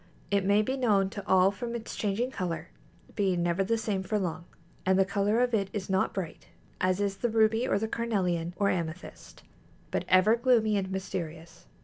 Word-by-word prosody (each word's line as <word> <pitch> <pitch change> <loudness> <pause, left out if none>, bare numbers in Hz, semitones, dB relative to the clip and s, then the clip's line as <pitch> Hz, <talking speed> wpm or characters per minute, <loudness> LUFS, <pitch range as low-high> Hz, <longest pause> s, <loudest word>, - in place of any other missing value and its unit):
It 200 -1 +2
may 205 +2 +3
be 260 +5 -2
known 200 -6 +2
to 200 - -6
all 190 0 +5
from 235 +3 -5
its 230 -1 -6
changing 220 +5 -1
color, 175 -7 -4 0.5
being 185 -4 +1
never 175 +2 +1
the 230 +4 0
same 210 -4 -2
for 210 +3 -1
long; 180 -3 -3 0.4
and 190 0 +3
the 195 - +4
color 205 +4 +1
of 250 -1 +1
it 200 -3 +1
is 195 -2 -4
not 190 0 +2
bright, 185 -5 -6 0.3
as 185 +1 +1
is 200 -1 -1
the 240 - 0
ruby 220 +2 +2
or - - +2
the 220 +2 -1
carnelian 180 -8 -1
or 200 +1 +1
amethyst, 170 -1 -5 0.5
but - - -1
ever 185 +5 +5
gloomy 235 -3 +3
and 190 -2 -1
mysterious. 170 -4 -6
195 Hz, 195 wpm, -29 LUFS, 185-220 Hz, 0.5 s, all